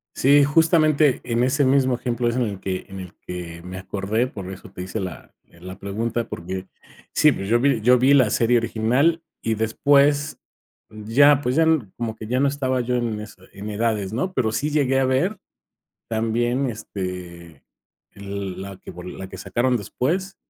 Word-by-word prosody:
Sí, 140 Hz, +1 st, +5 dB
justamente 155 Hz, -2 st, +3 dB
en 120 Hz, -1 st, 0 dB
ese 140 Hz, +3 st, +2 dB
mismo 130 Hz, -1 st, +3 dB
ejemplo 120 Hz, -1 st, -1 dB
es 120 Hz, -, -1 dB
en 125 Hz, -, +1 dB
el 100 Hz, -5 st, -3 dB
que 95 Hz, -1 st, -3 dB
en 95 Hz, 0 st, -8 dB
el 90 Hz, -2 st, -9 dB
que 85 Hz, -2 st, -7 dB
me 90 Hz, +1 st, -7 dB
acordé, 100 Hz, +5 st, -1 dB
por 100 Hz, -7 st, -8 dB
eso 95 Hz, 0 st, -10 dB
te 90 Hz, -, -8 dB
hice 95 Hz, +4 st, -4 dB
la 90 Hz, -3 st, -7 dB, 0.2 s
la 90 Hz, +2 st, -11 dB
pregunta, 115 Hz, +4 st, -2 dB
porque 95 Hz, +2 st, -6 dB, 0.5 s
sí, 150 Hz, -, +6 dB
pues, 95 Hz, -3 st, -5 dB
yo 120 Hz, +1 st, +3 dB
vi 135 Hz, -4 st, +2 dB
yo 125 Hz, +3 st, +5 dB
vi 130 Hz, +3 st, +4 dB
la 130 Hz, -5 st, +5 dB
serie 120 Hz, +1 st, +3 dB
original 125 Hz, +9 st, +1 dB, 0.2 s
y 115 Hz, -, 0 dB
después 140 Hz, +7 st, +2 dB, 0.5 s
ya, 120 Hz, +7 st, +4 dB
pues, 130 Hz, 0 st, -1 dB
ya 160 Hz, -, +4 dB, 0.3 s
como 115 Hz, -2 st, -4 dB
que 110 Hz, -, -8 dB
ya 125 Hz, +4 st, 0 dB
no 140 Hz, -, +3 dB
estaba 130 Hz, -2 st, -1 dB
yo 125 Hz, +1 st, -1 dB
en 115 Hz, -3 st, -2 dB
eso, 105 Hz, 0 st, -11 dB
en 105 Hz, +2 st, -6 dB
edades, 105 Hz, -2 st, -1 dB
¿no? 180 Hz, +11 st, -2 dB
Pero, 115 Hz, -4 st, +1 dB
sí 145 Hz, +6 st, -1 dB
llegué 135 Hz, -3 st, +2 dB
a -, -, +2 dB
ver 175 Hz, +11 st, +1 dB, 0.7 s
también, 120 Hz, +4 st, 0 dB
este, 90 Hz, -5 st, -7 dB, 0.5 s
el 100 Hz, -2 st, -6 dB
la 100 Hz, -1 st, -8 dB
que -, -, -13 dB
vol 90 Hz, +1 st, -9 dB
la 95 Hz, -, -7 dB
que -, -, -9 dB
sacaron 120 Hz, +6 st, 0 dB
después, 165 Hz, -, -2 dB
115 Hz, 185 wpm, -23 LUFS, 100-135 Hz, 0.7 s, sí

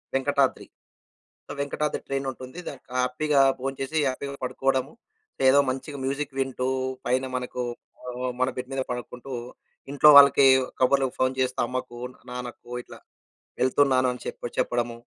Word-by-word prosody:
వెంకటాద్రి. 135 Hz, 0 st, +1 dB, 0.9 s
వెంకటాద్రి 150 Hz, +1 st, -2 dB
ట్రైనుంటుంది. 135 Hz, +1 st, -4 dB
దానికి 140 Hz, -, -9 dB, 0.2 s
హ్యాపీ‌గా 140 Hz, +3 st, +1 dB, 0.2 s
భోంచేసి, 135 Hz, +3 st, -2 dB
హ్యాపీ‌గా 140 Hz, +2 st, -4 dB
పడుకోడము. 130 Hz, +2 st, 0 dB, 0.5 s
లేదా 130 Hz, +1 st, +6 dB
మంచిగ 135 Hz, +2 st, -5 dB
మ్యూజిక్ 140 Hz, +1 st, -3 dB
వింటూ, 130 Hz, -1 st, -1 dB, 0.4 s
పైన 130 Hz, +2 st, +1 dB
మనకు 125 Hz, 0 st, -4 dB, 0.5 s
ఆహ్, 125 Hz, +1 st, -3 dB
మన 130 Hz, -, +3 dB
బెడ్ 125 Hz, +1 st, -5 dB
మీద 135 Hz, -, -1 dB
పడకుంటూ, 125 Hz, +2 st, -6 dB, 0.6 s
ఇంట్లో 145 Hz, +2 st, +5 dB
వాళ్ళకి 140 Hz, -1 st, +8 dB, 0.3 s
కబుర్లకు 135 Hz, 0 st, +3 dB
ఫోన్ 130 Hz, 0 st, +1 dB
చేస్తూ, 130 Hz, -1 st, 0 dB
అమ్మకు, 125 Hz, -1 st, -5 dB, 0.3 s
నాన్నకు 125 Hz, -1 st, -7 dB
ఇట్లా -, -, -13 dB, 0.6 s
వెళ్తున్నాను 130 Hz, 0 st, +3 dB
అని 125 Hz, -, -9 dB
చెప్పి 120 Hz, -, -5 dB
చెప్పడము. 120 Hz, -1 st, 0 dB
130 Hz, 125 wpm, -26 LUFS, 125-140 Hz, 0.9 s, వాళ్ళకి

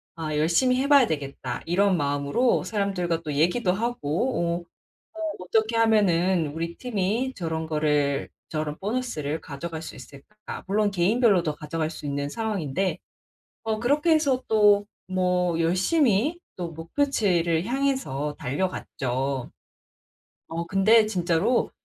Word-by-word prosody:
"아 155 Hz, -2 st, -3 dB
열심히 215 Hz, -, +3 dB
해 280 Hz, -, 0 dB
봐야 280 Hz, -5 st, +6 dB
되겠다." 145 Hz, -3 st, -4 dB
이런 190 Hz, +3 st, +2 dB
마음으로 145 Hz, -, +1 dB
사람들과 185 Hz, -6 st, -1 dB
또 150 Hz, -2 st, -4 dB
얘기도 180 Hz, +7 st, +2 dB
하고 175 Hz, -, -1 dB, 0.5 s
어 325 Hz, -, -10 dB
"어 320 Hz, -1 st, -3 dB
어떻게 220 Hz, +5 st, 0 dB
하면은 190 Hz, -7 st, +3 dB
우리 170 Hz, +1 st, -3 dB
팀이 235 Hz, +2 st, -1 dB
저런 160 Hz, -2 st, -3 dB
거를, 150 Hz, -2 st, 0 dB, 0.2 s
저런 155 Hz, -1 st, -3 dB
보너스를 195 Hz, -, -2 dB
가져갈 160 Hz, +2 st, -6 dB
수 160 Hz, -, -8 dB
있을까?" 140 Hz, -, -10 dB
물론 205 Hz, +1 st, +1 dB
개인별로도 190 Hz, -4 st, +2 dB
가져갈 155 Hz, +1 st, -3 dB
수 150 Hz, -, -9 dB
있는 140 Hz, 0 st, -2 dB
상황인데 195 Hz, -5 st, -2 dB, 0.7 s
어 220 Hz, -1 st, -1 dB
그렇게 295 Hz, +7 st, +2 dB
해서 280 Hz, -5 st, +2 dB
또 205 Hz, -2 st, +4 dB, 0.2 s
뭐 180 Hz, -2 st, +1 dB
열심히 230 Hz, -, +2 dB, 0.2 s
또 170 Hz, -2 st, -5 dB
목표치를 170 Hz, -, 0 dB
향해서 255 Hz, -, -1 dB
달려갔죠. 135 Hz, -4 st, -2 dB, 1.0 s
어 165 Hz, +1 st, -4 dB
근데 215 Hz, +5 st, +5 dB
진짜로 175 Hz, +3 st, +1 dB
180 Hz, 275 characters per minute, -25 LUFS, 160-225 Hz, 1.0 s, 봐야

